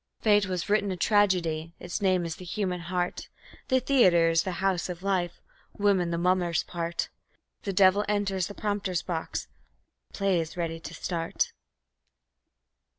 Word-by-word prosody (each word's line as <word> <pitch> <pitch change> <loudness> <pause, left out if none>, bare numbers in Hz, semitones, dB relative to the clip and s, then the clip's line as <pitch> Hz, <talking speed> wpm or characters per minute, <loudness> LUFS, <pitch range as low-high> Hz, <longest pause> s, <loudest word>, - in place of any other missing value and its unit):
Fate 205 -2 +4
has 185 -1 -3
written 205 -1 +2
a 185 - -3
tragedy; 170 -5 +2
its 180 +4 -4
name 185 -3 +2
is 165 -1 -4
"The - - -10
Human 180 0 -2
Heart". 175 +1 -3 0.4
The 260 - +3
Theatre 185 -11 +4
is 165 0 +3
the 185 - -3
House 190 0 0
of 180 0 -6
Life, 185 -3 0 0.4
Woman 195 -4 +2
the 170 - -1
mummer's 175 -1 +1
part; 170 -1 -3 0.5
The 195 - -3
Devil 190 +1 +5
enters 195 -3 0
the 205 - -9
prompter's 205 -4 -1
box 165 -3 -3
and - - -38 0.6
the - - -11
play 195 -3 +2
is 160 +1 -5
ready 165 -1 -2
to 165 - -8
start. 165 0 -2
185 Hz, 160 wpm, -28 LUFS, 170-200 Hz, 0.6 s, Devil